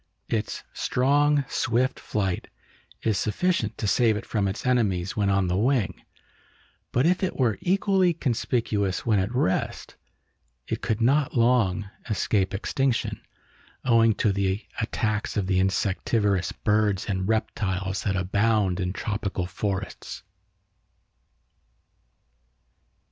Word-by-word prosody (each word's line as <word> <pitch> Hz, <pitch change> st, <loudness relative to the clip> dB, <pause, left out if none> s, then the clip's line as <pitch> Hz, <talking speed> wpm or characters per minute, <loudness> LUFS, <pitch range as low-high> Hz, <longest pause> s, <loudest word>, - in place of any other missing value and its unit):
Its 110 Hz, -2 st, -2 dB
strong, 145 Hz, +2 st, +2 dB
swift 125 Hz, +3 st, 0 dB
flight 95 Hz, -4 st, -2 dB, 0.6 s
is 110 Hz, -4 st, +1 dB
sufficient 115 Hz, -, 0 dB
to -, -, -3 dB
save 110 Hz, +1 st, +3 dB
it -, -, -6 dB
from 100 Hz, -3 st, 0 dB
its 95 Hz, +7 st, -4 dB
enemies 100 Hz, -8 st, +1 dB
when 100 Hz, -2 st, +1 dB
on 100 Hz, -1 st, +2 dB
the 90 Hz, -, 0 dB
wing, 115 Hz, -1 st, +1 dB, 0.9 s
but 125 Hz, +4 st, +2 dB
if 180 Hz, +3 st, +3 dB
it 190 Hz, -, -1 dB
were 120 Hz, -5 st, +1 dB
equally 190 Hz, 0 st, +2 dB
conspicuous 115 Hz, -, -1 dB
when 110 Hz, -4 st, +3 dB
at 95 Hz, +4 st, -1 dB
rest, 125 Hz, -7 st, -1 dB, 0.7 s
it -, -, -3 dB
could 110 Hz, 0 st, -1 dB
not 140 Hz, +4 st, +2 dB
long 115 Hz, -5 st, +2 dB, 0.2 s
escape 100 Hz, -2 st, +1 dB
extinction 125 Hz, +5 st, -1 dB, 0.6 s
owing 115 Hz, -3 st, +4 dB
to 105 Hz, -, +2 dB
the 95 Hz, +1 st, -1 dB, 0.2 s
attacks 110 Hz, -1 st, -1 dB
of 100 Hz, -, +1 dB
the 95 Hz, 0 st, +1 dB
insectivorous 95 Hz, 0 st, +1 dB
birds 105 Hz, -3 st, +1 dB
and 95 Hz, -2 st, -2 dB
reptiles 95 Hz, -3 st, -1 dB
that 100 Hz, -2 st, -1 dB
abound 100 Hz, 0 st, +1 dB
in 90 Hz, -1 st, -1 dB
tropical 100 Hz, -3 st, -3 dB
forests." 100 Hz, +1 st, -4 dB
105 Hz, 120 wpm, -26 LUFS, 95-120 Hz, 0.9 s, owing